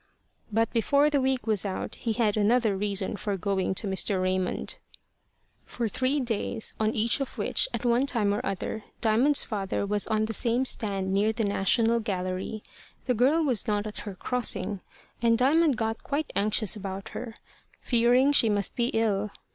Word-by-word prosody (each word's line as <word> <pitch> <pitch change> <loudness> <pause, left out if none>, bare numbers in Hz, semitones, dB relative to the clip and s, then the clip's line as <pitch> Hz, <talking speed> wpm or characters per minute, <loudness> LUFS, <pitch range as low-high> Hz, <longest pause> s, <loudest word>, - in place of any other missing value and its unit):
But 225 +2 0
before 280 +6 +3
the 285 -2 +2
week 260 -1 0
was 215 -4 +1
out, 195 -2 -4
he 230 -3 -3
had 215 -3 +1
another 220 0 +2
reason 200 0 -1
for 200 0 -3
going 190 0 -1
to 205 - -2
Mr. 190 0 +1
Raymond. 185 0 -1 0.8
For 235 -2 -3
three 260 +6 0
days, 230 -2 -2
on 220 0 0
each 230 +5 +2
of 275 - -5
which, - - +1
at - - -4
one 240 +3 +2
time 215 -6 +1
or 205 - -2
other, 195 +3 -4 0.2
Diamond's 245 +6 +4
father 200 -2 -3
was 205 0 0
on 215 -1 +1
the 225 - -4
same 240 +4 +1
stand 195 -6 0
near 205 +3 +2
the 225 0 -2
National 225 +3 +2
Gallery, 190 0 -4 0.4
the 250 - +1
girl 270 +8 +3
was 250 -6 -1
not 210 -1 0
at 215 - -5
her 200 -2 -7
crossing, 225 -2 -2 0.4
and 230 -1 +3
Diamond 285 +2 +3
got 225 -1 -2
quite 290 +1 -3
anxious 210 0 +2
about 195 -1 -6
her, 235 -2 -7 0.4
fearing 245 +3 +3
she 235 -6 +5
must 205 -2 +1
be 240 -1 +1
ill. 210 -2 +1
220 Hz, 175 wpm, -27 LUFS, 200-245 Hz, 0.8 s, she